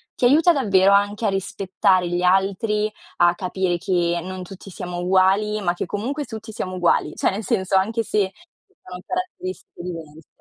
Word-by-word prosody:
ti 250 - +1
aiuta 310 +7 +6
davvero 200 - +3
anche 205 +2 +2
a 205 - +3
rispettare 190 -1 0
gli 175 0 -1
altri, 200 +3 +1 0.3
a 175 0 +5
capire 185 -1 -1
che 175 -1 0
non 185 +1 -6
tutti 195 +2 -11
siamo 180 -1 -6
uguali, 190 +4 +2
ma 175 -3 +1
che 175 - -4
comunque 265 - -3
tutti 220 -2 -8
siamo 185 -3 -5
uguali. 170 -4 +1
Cioè - - +1
nel 205 +3 -4
senso, 195 -4 0
anche 225 +4 0
se 205 -3 0
ci 355 +3 -27
sono 180 0 -8
caratteristiche 370 - -5
diverse. 160 -3 -8
195 Hz, 175 wpm, -22 LUFS, 180-220 Hz, 0.3 s, aiuta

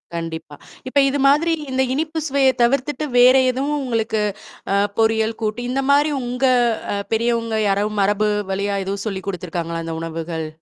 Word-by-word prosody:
கண்டிப்பா. 160 -3 -6 0.3
இப்ப 280 +2 +2
இது 285 +1 -1
மாதிரி 325 +4 +3 0.2
இந்த 260 0 +1
இனிப்பு 320 +2 -2
சுவைய 270 -1 +3
தவிர்த்துட்டு 275 +4 0
வேற 250 +2 +7 0.2
எதுவும் 280 +4 -2
உங்களுக்கு 225 -3 -1 0.5
அ - - +3 0.2
பொறியல் 220 0 +1
கூட்டு, 215 +3 -2
இந்த 270 +2 0
மாரி 290 +2 +3
உங்க 250 +2 -1 0.5
அ - - -1 0.2
பெரியவங்க 230 -1 0
யாராவது 210 +2 0
மரபு 205 +2 +2 0.2
வழியா 200 +1 -1
எதுவும் 200 +2 -4
சொல்லிக் 195 -1 -5
குடுத்துருக்காங்களா? 170 -2 -4
இந்த 165 0 -4
உணவுகள்? 165 0 -4
225 Hz, 155 wpm, -20 LUFS, 195-265 Hz, 0.5 s, வேற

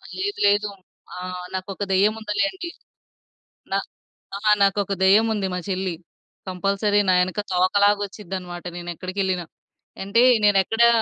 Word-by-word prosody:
లేదు. 405 +2 -3
లేదు. 205 +1 +3 0.5
ఆ! - - -8 0.4
నాకొక 190 +1 -4
దెయ్యముందిలేండి. 215 - 0 1.0
నా - - +2 0.6
ఆ! - - -4 0.2
నాకొక 200 0 +1
దెయ్యముంది 210 +1 +4
మా - - -2
చెల్లి 185 -2 -2 0.5
కంపల్సరీ 200 +3 +1
నా 185 - +5
యెనక 185 +3 0
తోకలాగొచ్చిద్దనమాట. 190 -1 0
నేనెక్కడికెళ్ళినా. 185 +1 -3 0.6
అంటే 200 +5 +2 0.2
నేనెక్కడా, 210 +4 +4
200 Hz, 100 wpm, -23 LUFS, 185-210 Hz, 1.0 s, నా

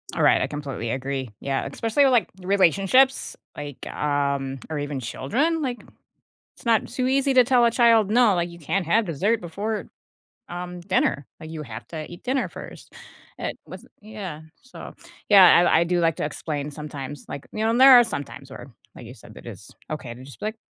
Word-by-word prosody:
Alright, - - +4
I - - 0
completely 140 -6 -5
agree, 135 -2 -4
yeah, 135 -1 -2
especially 230 - +1
with, 265 - +3
like, 230 -7 +2
relationships, 195 +8 +3 0.2
like, 145 -2 -8
um, 140 -2 -2
or 155 -2 -3
even 145 -2 -4
children, 275 - -1
like, 250 -4 -4 0.7
it's - - -18
not 230 -2 +2
too 255 +2 -2
easy 270 0 +1
to 250 - +7
tell 250 -1 +3
a 235 - +5
child, 230 -4 +4
"No, 235 -2 +4
like, 175 0 -1
you 170 - -12
can't 175 +3 -2
have 220 +5 +3
dessert 200 +7 0
before, 205 +6 -4 0.7
um, 175 0 -6
dinner. 175 -6 0
Like, 160 - -10
you 160 -1 -6
have 115 -3 -9
to 155 -1 -7
eat 175 +2 -11
dinner 260 +1 0
first." - - -11 0.5
It - - -4
was - - -11 0.2
Yeah, 200 -8 -8 0.2
so, 260 - -11 0.4
yeah, 190 -4 +8
I 160 - +4
I 170 - +2
do 175 +1 0
like 165 -2 +1
to - - -3
explain 150 -1 -4
sometimes, 145 -2 -8
like 140 - -7
you 215 - -2
know, 225 +1 +2
there 260 -1 +9
are 240 - +6
sometimes 140 -8 -7
where, 135 0 -10 0.2
like - - -11
you 125 - -10
said, 110 - -15
that - - -13
is - - -10 0.2
okay 135 -6 -5
to 125 - -12
just 140 - -14
be, 210 - -3
like, 220 +1 -4
175 Hz, 195 wpm, -24 LUFS, 145-225 Hz, 0.7 s, there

